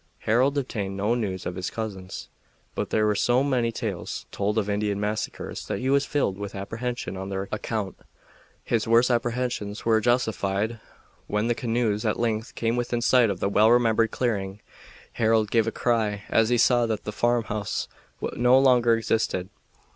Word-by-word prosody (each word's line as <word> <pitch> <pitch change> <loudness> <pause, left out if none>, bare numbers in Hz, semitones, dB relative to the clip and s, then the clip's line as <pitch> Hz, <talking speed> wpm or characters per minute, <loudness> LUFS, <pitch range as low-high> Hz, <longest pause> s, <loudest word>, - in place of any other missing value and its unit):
Harold 130 +6 +2
obtained 100 -8 -3
no 105 +4 +1
news 100 -6 -3
of 90 - -3
his 90 0 -4
cousins, 100 -5 -6 0.5
but - - -3
there 110 - +2
were 105 - +3
so 120 +5 +2
many 125 -4 +1
tales 110 -6 -4
told 105 +2 -1
of 105 -2 +1
Indian 105 0 -1
massacres 105 +1 -4
that - - -2
he 130 +1 -1
was 140 0 +2
filled 100 -9 0
with 100 -1 -6
apprehension 115 +3 -4
on 95 +1 -5
their 95 0 -3
account. 110 -2 -3 0.7
His 115 -2 0
worst 115 +2 +4
apprehensions 120 -3 -2
were 110 -1 +3
justified 110 -2 0 0.5
when 105 +1 0
the - - +3
canoes 115 -3 -1
at 105 -2 0
length 115 -1 -1
came 115 0 0
within 120 -1 -1
sight 125 -1 +4
of 95 -3 -3
the - - +2
well 105 +2 +4
remembered 115 -2 +4
clearing. 100 -5 -2 0.5
Harold 110 -2 +2
gave 115 -1 +3
a - - 0
cry 110 -5 0
as 115 0 +3
he 120 - +3
saw 120 0 +4
that 110 -2 -2
the 105 - -4
farmhouse 110 -2 -1 0.5
no 125 +2 +4
longer 125 -3 +5
existed. 110 -5 -1
110 Hz, 170 wpm, -25 LUFS, 105-120 Hz, 0.7 s, longer